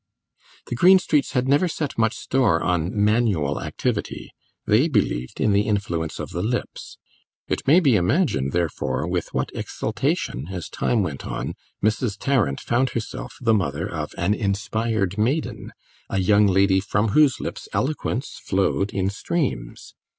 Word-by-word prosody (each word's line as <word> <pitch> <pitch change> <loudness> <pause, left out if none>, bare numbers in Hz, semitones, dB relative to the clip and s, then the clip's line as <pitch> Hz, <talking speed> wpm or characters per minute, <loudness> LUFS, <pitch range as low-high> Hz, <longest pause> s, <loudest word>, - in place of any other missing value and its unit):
The - - -5
Greenstreets 175 -1 +4
had 125 0 +1
never 145 +7 +3
set 155 -4 -3
much 110 0 +1
store 120 -11 +1
on 90 -2 0
manual 105 -8 +1
activity; - - -3 0.3
they 115 +9 +4
believed 65 - -1
in 105 - +2
the 100 +1 +2
influence 85 -6 -2
of - - -5
the 90 - -3
lips. 120 +5 -4 0.5
It - - -3
may 155 +6 +7
be 140 -10 +4
imagined, 90 - +1
therefore, 75 -4 -1
with 90 -1 -2
what - - -2
exultation, 65 +5 -2
as 90 -4 -5
time 115 -4 0
went 75 -6 -4
on, - - -4 0.3
Mrs. 110 -1 0
Tarrant 120 - +1
found 125 +2 +1
herself 115 - -6
the 115 -2 +3
mother 85 -4 0
of 80 -6 -5
an 85 +4 +1
inspired 105 0 -1
maiden, 135 +9 -1 0.4
a - - -1
young 100 +2 +4
lady 95 0 +4
from 105 +3 0
whose 145 +4 +4
lips - - -6
eloquence 135 -2 -2
flowed 95 +1 0
in 95 0 -1
streams. 100 - -3
105 Hz, 150 wpm, -23 LUFS, 90-125 Hz, 0.5 s, may